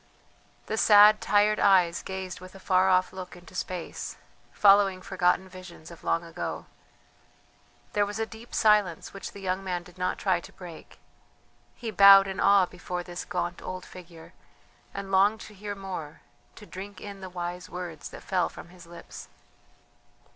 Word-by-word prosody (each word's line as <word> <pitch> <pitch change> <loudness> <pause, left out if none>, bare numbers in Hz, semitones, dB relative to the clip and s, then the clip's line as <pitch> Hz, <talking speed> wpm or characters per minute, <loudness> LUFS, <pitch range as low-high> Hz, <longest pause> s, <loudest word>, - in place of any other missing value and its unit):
The 220 - -3
sad, 210 -1 +7
tired 210 +1 +3
eyes 180 -4 +4
gazed 190 -1 -6
with 185 +1 -13
a - - -11
far 185 0 +2
off 185 0 +2
look 185 -1 -8
into 175 +1 -15
space, 180 -1 -5 0.3
following 195 -2 +5
forgotten 185 0 0
visions 185 -3 -12
of 170 - -14
long 165 - 0
ago. 165 -1 -6 1.3
There 205 -1 +2
was 205 +1 -5
a 225 - -1
deep 220 +2 -11
silence 210 -6 +2
which 195 - -7
the 200 - -11
young 190 0 -2
man 180 -2 -3
did 180 +1 -17
not 180 0 -1
try 185 -3 +1
to - - -13
break. 175 -3 -12 0.8
He 230 -3 -6
bowed 195 0 +8
in 190 -1 -5
awe 200 -2 +5
before 180 0 -6
this 175 0 -7
gaunt 175 -2 -3
old 185 0 -6
figure, 170 -3 -13 0.6
and 195 0 -7
longed 200 +3 +3
to 210 - -11
hear 205 +1 -6
more, 185 -6 -7 0.3
to 210 - -12
drink 200 0 -9
in 200 -1 -9
the 190 - -7
wise 180 0 -6
words 175 -3 -7
that - - -11
fell 185 -3 0
from - - -12
his 175 -1 -15
lips. 170 - -11
185 Hz, 170 wpm, -27 LUFS, 180-200 Hz, 1.3 s, bowed